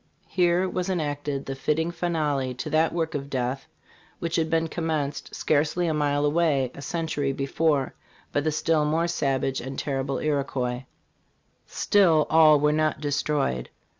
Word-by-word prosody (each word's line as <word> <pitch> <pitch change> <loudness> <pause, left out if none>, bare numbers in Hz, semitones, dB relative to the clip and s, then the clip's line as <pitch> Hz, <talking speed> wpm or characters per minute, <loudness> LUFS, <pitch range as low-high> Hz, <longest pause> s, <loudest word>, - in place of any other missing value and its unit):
Here 180 0 +2
was 180 0 -2
enacted 145 -5 -2
the 135 - -4
fitting 155 +5 -1
finale 150 -7 -1
to 135 +5 -5
that 160 +2 +3
work 165 -2 -2
of 140 -1 -4
death 130 +2 -2 0.5
which 170 -1 -3
had 160 -1 +1
been 165 0 +1
commenced, 155 -3 -3
scarcely 155 +4 +1
a 160 - +1
mile 145 -1 +1
away, 145 -5 +2
a - - -10
century 150 -1 -2
before 140 +1 0 0.4
by 145 - +2
the 155 +2 0
still 155 0 +1
more 160 +3 +1
savage 135 -5 -1
and 135 +2 -6
terrible 135 -1 -2
Iroquois 135 -4 -1 0.5
" - - -43
Still, 170 -7 +3
all 155 -2 +7
were 150 +1 +3
not 155 -2 +1
destroyed. 145 - -1
150 Hz, 155 wpm, -25 LUFS, 140-160 Hz, 0.5 s, all